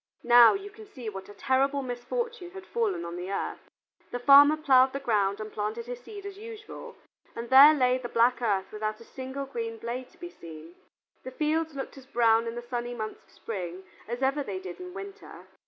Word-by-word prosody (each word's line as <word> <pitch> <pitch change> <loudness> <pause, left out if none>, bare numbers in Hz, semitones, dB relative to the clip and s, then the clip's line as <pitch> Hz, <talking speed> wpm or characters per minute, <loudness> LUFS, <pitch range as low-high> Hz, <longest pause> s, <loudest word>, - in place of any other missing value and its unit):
Now 240 +3 +7
you 400 +1 -7
can 435 0 -13
see 255 - -7
what 195 -1 -9
a - - -10
terrible 275 +1 +1
misfortune 360 - -4
had 385 -1 -9
fallen 435 - -1
on 170 +1 -6
the 180 +2 -5
earth. 200 - -4 0.4
The 245 - -3
farmer 285 +4 +7
plowed 265 -3 +4
the 275 - -3
ground 205 -6 0
and 215 0 -7
planted 215 +2 -3
his 245 0 -6
seed, 405 - -10
as 400 0 -8
usual, 440 -1 -10 0.4
and 235 +1 -6
there 285 +4 +9
lay 255 -2 +2
the 245 -1 -6
black 240 +2 +2
earth 200 -5 0
without 215 0 -4
a - - -12
single 265 +3 -6
green 230 -4 -5
blade 245 +3 -5
to - - -24
be 350 0 -8
seen. 160 0 -12 0.5
The - - -7
fields 310 +3 -1
looked 270 0 -6
as 265 - -17
brown 230 -2 +3
in 230 - -4
the 240 - -6
sunny 240 0 -4
months 215 -2 -6
of - - -31
spring 185 -4 -6 0.2
as 240 +3 -4
ever 275 +2 +1
they 200 -8 -4
did 185 -2 -9
in 360 0 -9
winter. 395 +1 -10
250 Hz, 210 wpm, -28 LUFS, 225-300 Hz, 0.5 s, there